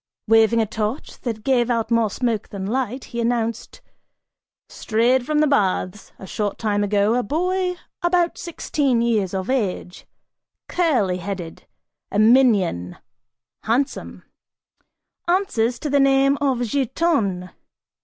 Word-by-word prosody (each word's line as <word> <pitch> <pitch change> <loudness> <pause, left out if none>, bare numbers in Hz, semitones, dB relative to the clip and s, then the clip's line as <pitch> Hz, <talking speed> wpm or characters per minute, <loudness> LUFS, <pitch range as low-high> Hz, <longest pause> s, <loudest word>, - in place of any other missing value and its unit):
Waving 225 +1 +4
a 225 - +2
torch 220 +4 -4
that 225 -3 -4
gave 250 -2 +2
out 230 -1 -1
more 230 -2 +3
smoke 230 -1 -2
than 195 -2 -6
light, 255 +3 -2
he 235 - -1
announced: 230 -1 -2 0.9
"Strayed 240 +3 +1
from 305 0 +2
the - - +4
baths, 200 -6 0
a - - -10
short 205 +1 -3
time 205 -2 0
ago, 205 +1 +2
a 250 - +2
boy 360 - -1 0.3
about 345 -1 +1
sixteen 280 -7 -1
years 210 -5 0
of 190 -1 -3
age, 205 -8 -3 0.6
curly 245 - +1
headed, 180 -2 -7 0.4
a - - -2
minion, 210 - +3 0.6
handsome, 255 +6 -2 1.0
answers 250 - +1
to 300 - -5
the 285 0 +2
name 275 0 +4
of 265 -4 +1
Giton. 240 - 0
230 Hz, 125 wpm, -22 LUFS, 205-270 Hz, 1.0 s, Waving